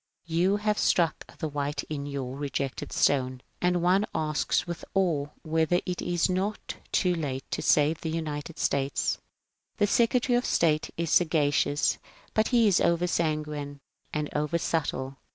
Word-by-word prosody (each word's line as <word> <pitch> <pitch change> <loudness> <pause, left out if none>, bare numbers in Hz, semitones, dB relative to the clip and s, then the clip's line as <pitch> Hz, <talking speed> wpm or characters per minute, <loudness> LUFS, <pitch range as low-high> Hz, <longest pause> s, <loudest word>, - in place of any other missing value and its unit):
You 175 +4 +2
have 210 0 0
struck 170 -3 +1
the 160 - -2
white 145 0 -2
in 145 -2 -5
your 135 -2 -4
'^ - - -10
Rejected 140 -1 -3
Stone." 130 -2 +1 0.2
And 180 -1 +2
one 190 +4 +3
asks 155 -1 0
with 170 -1 -6
awe 165 -7 +2 0.2
whether 160 +2 +2
it 180 -1 -3
is 175 -1 +1
not 195 +3 -1 0.2
already - - -21
too 180 -1 +2
late 140 -5 -3
to - - -1
save 155 +2 +3
the 160 - -3
^^ - - -4
United 155 0 -4
States? 140 0 0 0.3
"... - - -51
The 205 - +4
Secretary 240 +3 +2
of 245 - +2
State 155 -2 +2
is 165 -2 -1
sagacious 145 -3 +2 0.2
— - - -27
but 215 0 +2
he 235 -3 +4
is 195 - +4
over 170 +1 +2
sanguine 150 -4 -2 0.3
and 150 -1 -1
over 150 +3 +1
subtle. 140 -5 -2
160 Hz, 170 wpm, -28 LUFS, 145-180 Hz, 0.3 s, The